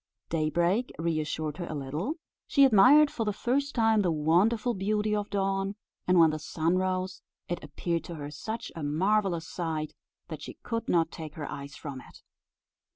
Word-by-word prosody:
Daybreak 170 +8 +1
reassured 155 -2 -2
her 175 - -4
a 155 - -4
little; 150 - -3 0.3
she 280 -1 +6
admired 270 +6 +7
for 230 - -2
the 210 - 0
first 275 +7 -1
time 225 -2 +4
the 185 - +1
wonderful 190 +10 +2
beauty 210 +1 0
of 205 -1 -2
dawn; 195 0 -1 0.3
and 180 0 +4
when 165 -2 +7
the 155 - -3
sun 165 +3 0
rose, 185 0 -1 0.3
it 175 -2 -4
appeared 165 +3 -2
to 170 - -7
her 145 -1 -6
such 220 +8 -5
a 165 - -5
marvellous 170 +3 +1
sight 160 -3 -3 0.3
that - - -7
she - - -8
could 230 -1 -3
not 165 -2 +2
take 155 -2 -8
her 150 -3 -5
eyes 140 0 -7
from 140 -3 -7
it. - - -16
180 Hz, 175 wpm, -29 LUFS, 155-210 Hz, 0.3 s, admired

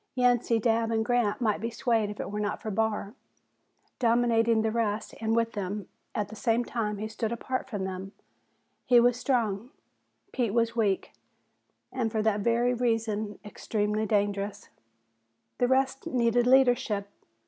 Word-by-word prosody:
Yancey, 245 -2 +3
Dabb 225 0 +1
and 220 -1 0
Grant 240 -2 +1
might 215 -4 +1
be 230 - -2
swayed 230 -2 0
if 210 - -8
it - - -4
were 210 - -3
not 210 0 -2
for 215 - -5
Barr. 210 0 -1 0.9
Dominating 230 -2 +3
the 220 - +1
rest, 215 -2 -1
and 225 0 +1
with 230 0 +1
them, 205 -1 -4 0.3
at 210 -3 -1
the 220 - -9
same 235 +1 +1
time 210 -3 -2
he 215 +2 -4
stood 220 0 -3
apart 255 +3 -3
from 205 -6 -3
them. 190 0 -5 0.8
He 245 -1 +7
was 245 0 +4
strong, 235 -4 -1 0.6
Pete 235 -4 -1
was 230 0 +1
weak 205 -5 0 0.8
and 240 -4 -1
for 215 -1 0
that 215 -1 +2
very 235 +3 +2
reason 225 -3 -1
extremely 210 0 -2
dangerous. 205 -1 -1 0.9
The 245 - +3
rest 265 +1 +1
needed 240 -1 +2
leadership. 245 -6 +3
225 Hz, 155 wpm, -28 LUFS, 210-240 Hz, 0.9 s, He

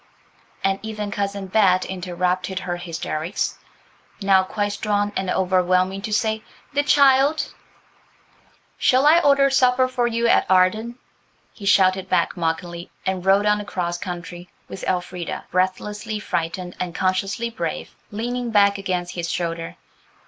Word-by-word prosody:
and 195 0 +1
even 215 -2 -5
Cousin 200 -1 -3
Bet 190 -2 +3
interrupted 185 0 -2
her 175 -1 -3
hysterics, 170 0 -3 0.6
now 195 -2 +4
quite 205 +2 -2
strong 205 0 -1
and 190 -1 -2
overwhelming, 185 +1 +1
to 215 - -5
say, 220 0 0 0.3
"The 285 - +3
child–" 280 +1 +4 1.3
"Shall 260 +2 +4
I 315 +3 +7
order 280 -3 +4
supper 255 -1 +4
for 250 -2 0
you 235 0 0
at - - +3
Arden?" 215 +6 +2 0.6
he 200 - -8
shouted 190 -1 +3
back 175 -2 +1
mockingly, 170 +1 -3 0.2
and 190 -1 -1
rode 195 +2 +4
on 210 0 +2
across 175 -4 -3
country, 175 -1 -7 0.2
with 190 - -8
Elfrida, 180 -1 -3
breathlessly 210 +4 -1
frightened 175 -1 -3
and 175 -2 -4
consciously 195 +5 -1
brave, 235 - -4 0.2
leaning 240 +3 -3
back 200 -2 +3
against 180 -2 -3
his 170 -1 -4
shoulder. 165 -1 -3
195 Hz, 135 wpm, -22 LUFS, 180-220 Hz, 1.3 s, I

